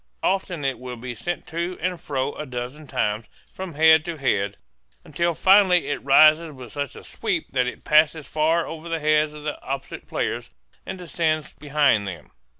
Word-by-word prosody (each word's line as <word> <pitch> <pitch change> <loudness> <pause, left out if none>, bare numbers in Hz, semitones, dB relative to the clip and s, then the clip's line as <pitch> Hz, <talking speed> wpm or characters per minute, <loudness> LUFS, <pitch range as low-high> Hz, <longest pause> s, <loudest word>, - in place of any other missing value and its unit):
Often 180 -6 -1
it 135 -3 -1
will 125 -1 -6
be 120 +1 -6
sent 175 +8 -4
to 170 +2 -3
and 180 0 -2
fro 135 -1 -2
a 150 - -7
dozen 125 +4 -6
times, 110 -5 -1 0.3
from 185 -4 -7
head 160 0 +6
to 170 -2 -4
head, 100 -7 0 0.5
until 170 +3 -1
finally 190 -1 +5
it 145 - -3
rises 155 +4 +6
with 125 -4 -11
such 145 -2 -4
a - - -11
sweep - - -3
that 125 -2 +1
it 125 - -6
passes 155 0 +3
far 160 +2 +1
over 165 +1 -8
the 165 - 0
heads 155 0 +2
of 150 - -10
the 150 -1 -4
opposite 135 0 -6
players - - -3 0.4
and - - -5
descends 155 -3 -1
behind 145 -8 +2
them. 85 -6 -8
150 Hz, 180 wpm, -24 LUFS, 130-165 Hz, 0.5 s, head